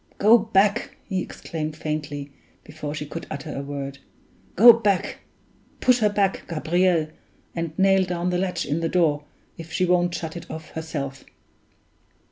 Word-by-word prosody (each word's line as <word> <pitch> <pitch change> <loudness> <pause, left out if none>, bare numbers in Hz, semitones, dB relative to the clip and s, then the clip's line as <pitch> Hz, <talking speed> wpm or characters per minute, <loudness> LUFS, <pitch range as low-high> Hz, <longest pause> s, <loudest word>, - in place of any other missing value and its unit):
"Go 225 +3 +6
back!" 205 -2 +1
he 190 -3 -2
exclaimed 155 -3 -5
faintly, 145 -2 -4 0.3
before 150 -1 -6
she 150 - -4
could 165 +3 -7
utter 140 - -6
a 140 - -3
word; 140 -1 -6 0.6
"go 235 +5 +10
back 205 -5 0 0.6
push 250 -1 +4
her 210 -2 +3
back, 200 -2 +1
Gabriel, 170 0 +1 0.5
and 165 -2 -4
nail 195 0 +4
down 180 0 -2
the 180 - 0
latch 185 -1 -1
in 150 +3 -1
the 165 0 -1
door, 150 -5 +2 0.3
if 165 -1 -9
she 185 - +1
won't 175 -1 +2
shut 160 -1 -5
it 170 - -8
of 160 0 -7
herself!" 145 -4 -5
170 Hz, 155 wpm, -24 LUFS, 155-190 Hz, 0.6 s, go